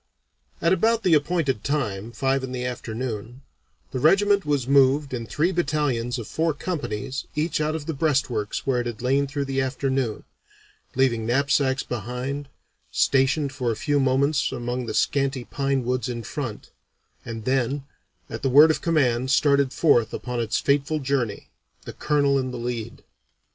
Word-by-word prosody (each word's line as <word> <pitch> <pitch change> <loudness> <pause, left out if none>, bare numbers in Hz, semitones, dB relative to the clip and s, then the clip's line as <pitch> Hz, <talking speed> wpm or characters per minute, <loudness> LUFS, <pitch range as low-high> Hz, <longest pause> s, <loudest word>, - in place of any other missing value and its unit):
At 170 +2 +4
about 225 +4 +2
the 180 - +3
appointed 150 -6 +1
time, 115 -7 -2
five 135 +3 0
in 130 -1 -5
the 125 -1 -3
afternoon, 120 0 -5 0.5
the 130 - -3
regiment 200 +4 +3
was 140 -4 0
moved 140 +1 +4
in 115 -2 -4
three 165 +9 +1
battalions 145 -8 0
of 115 -3 -6
four 160 -1 0
companies 135 - -4
each 155 +1 0
out 155 +1 0
of 155 -2 -5
the 160 - -2
breastworks 135 -8 -1
where 130 -2 +1
it 120 - -4
had 120 0 -6
lain 135 +2 +2
through 140 0 -3
the 135 0 -1
afternoon, 130 -3 -1 0.7
leaving 120 -4 +1
knapsacks 135 +1 +2
behind, 125 +5 -4 0.4
stationed 135 +1 +2
for 130 -3 -2
a - - -2
few 145 +6 0
moments 135 +2 +2
among 125 -1 -3
the - - -3
scanty 135 -2 +1
pine 135 0 -1
woods 125 0 -1
in 120 -1 -4
front, 120 -2 -6 0.5
and 115 -2 -7
then 135 +1 0 0.4
at - - -6
the 135 - +1
word 150 +5 +8
of - - -2
command 130 -6 +1
started 140 -1 +3
forth 120 -9 +3
upon 125 -1 -4
its 115 -2 0
fateful 145 +2 +1
journey, 130 -7 -2 0.3
the - - -8
Colonel 140 -2 +2
in 130 -1 -2
the 125 - -5
lead. 120 -2 -5
135 Hz, 165 wpm, -24 LUFS, 120-145 Hz, 0.7 s, word